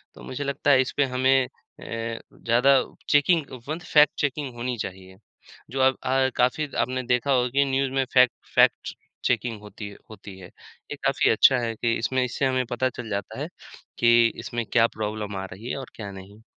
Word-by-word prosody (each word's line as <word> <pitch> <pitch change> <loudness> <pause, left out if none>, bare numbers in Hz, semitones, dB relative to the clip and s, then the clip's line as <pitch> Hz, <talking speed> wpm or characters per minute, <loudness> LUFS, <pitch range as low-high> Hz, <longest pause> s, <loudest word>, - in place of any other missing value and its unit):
तो - - -13
मुझे 135 +3 -5
लगता 140 +1 0
है 130 -1 +6
इसपे 140 +2 0
हमें 130 0 +3
अ, - - -14 0.3
ज़्यादा 115 +3 +1 0.3
चेकिंग 150 +1 +3 0.2
वन 160 +2 -2
फैक्ट 150 -1 +7
चेकिंग 140 -2 -2
होनी 125 +1 -3
चाहिए, 95 -1 -7 0.5
जो 135 - -3
अब 130 0 +4
अ, 130 0 +2
काफ़ी 130 +5 +1
आपने 130 +1 -1
देखा 125 +3 0
होगा 125 -1 +2
कि 140 +2 +2
न्यूज़ 135 0 0
में 135 0 +1
फैक्ट 125 -2 +6 0.2
फ़ैक्ट्स - - +3 0.3
चेकिंग 115 -4 0
होती 105 0 -9
है 100 - -13
होती 100 -3 -11
है। 90 - -10
ये - - -13
काफ़ी - - +2
अच्छा 130 - +5
है 115 -1 -2
कि 115 +1 0
इसमें 125 +3 0
इससे 125 +2 -1
हमें 130 -1 +1
पता 130 +2 +1
चल 120 -2 -8
जाता 100 0 -4
है - - -3 0.5
कि 120 0 +5
इसमें 120 -1 -4
क्या 115 +2 +3
प्रॉब्लम 105 -1 -4
आ 95 - -4
रही 110 +6 -9
है - - -3
और 135 - -8
क्या 100 -3 -7
नहीं। 100 +3 -12
125 Hz, 190 wpm, -25 LUFS, 115-135 Hz, 0.5 s, फैक्ट